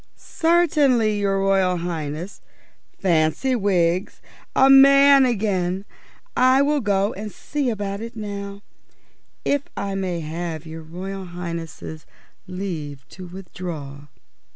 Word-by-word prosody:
"Certainly, 285 Hz, -10 st, +2 dB
your 195 Hz, -1 st, +1 dB
Royal 190 Hz, -2 st, +2 dB
Highness. 165 Hz, +1 st, -5 dB, 0.6 s
Fancy, 175 Hz, -, +1 dB
Wiggs, 185 Hz, -4 st, +1 dB, 0.4 s
a 265 Hz, -, +6 dB
man 275 Hz, 0 st, +7 dB
again! 195 Hz, -4 st, -1 dB, 0.5 s
I 260 Hz, +2 st, +5 dB
will 295 Hz, 0 st, +1 dB
go 200 Hz, -1 st, +1 dB
and 210 Hz, +1 st, -6 dB
see 285 Hz, +3 st, -3 dB
about 200 Hz, -2 st, -3 dB
it 230 Hz, +1 st, -7 dB
now, 200 Hz, -1 st, -6 dB, 0.8 s
if 285 Hz, -1 st, +2 dB, 0.2 s
I 200 Hz, -1 st, -2 dB
may 185 Hz, -3 st, -2 dB
have 160 Hz, 0 st, -5 dB
your 160 Hz, 0 st, -8 dB
Royal 185 Hz, +4 st, -7 dB
Highness's 170 Hz, -2 st, -7 dB, 0.4 s
leave 160 Hz, -8 st, -6 dB
to 185 Hz, -1 st, -10 dB
withdraw?" 165 Hz, -6 st, -8 dB
195 Hz, 110 wpm, -22 LUFS, 170-225 Hz, 0.8 s, man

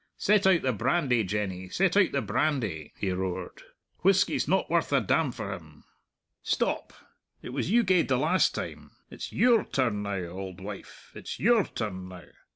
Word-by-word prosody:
Set 205 Hz, -1 st, +3 dB
out 185 Hz, -3 st, +4 dB
the 130 Hz, -1 st, +1 dB
brandy, 125 Hz, -, +1 dB
Jenny, 95 Hz, -2 st, -3 dB
set 185 Hz, -, +1 dB
out 200 Hz, -3 st, +4 dB
the 140 Hz, -, -1 dB
brandy," 110 Hz, -, -1 dB
he 95 Hz, -, -1 dB
roared; 90 Hz, -1 st, -4 dB, 0.4 s
"whisky's 190 Hz, +1 st, +3 dB
not 190 Hz, -, +2 dB
worth 170 Hz, -3 st, 0 dB
a 140 Hz, -, +4 dB
damn 130 Hz, -, +1 dB
for 100 Hz, -4 st, -5 dB
him! 80 Hz, -5 st, -12 dB, 0.6 s
Stop; -, -, -1 dB, 0.5 s
it -, -, -7 dB
was -, -, -2 dB
you 235 Hz, +3 st, +4 dB
gaed 185 Hz, -4 st, +3 dB
the 130 Hz, -, +2 dB
last 160 Hz, +8 st, +2 dB
time -, -, -6 dB, 0.2 s
it's -, -, -7 dB
your 235 Hz, -4 st, +4 dB
turn 115 Hz, -6 st, -1 dB
now, 100 Hz, -3 st, -3 dB
auld 95 Hz, 0 st, -7 dB
wife, 100 Hz, +1 st, -10 dB
it's -, -, -7 dB
your 230 Hz, -1 st, +4 dB
turn 95 Hz, -5 st, -5 dB
now! 90 Hz, -1 st, -10 dB
125 Hz, 170 wpm, -28 LUFS, -, 0.6 s, out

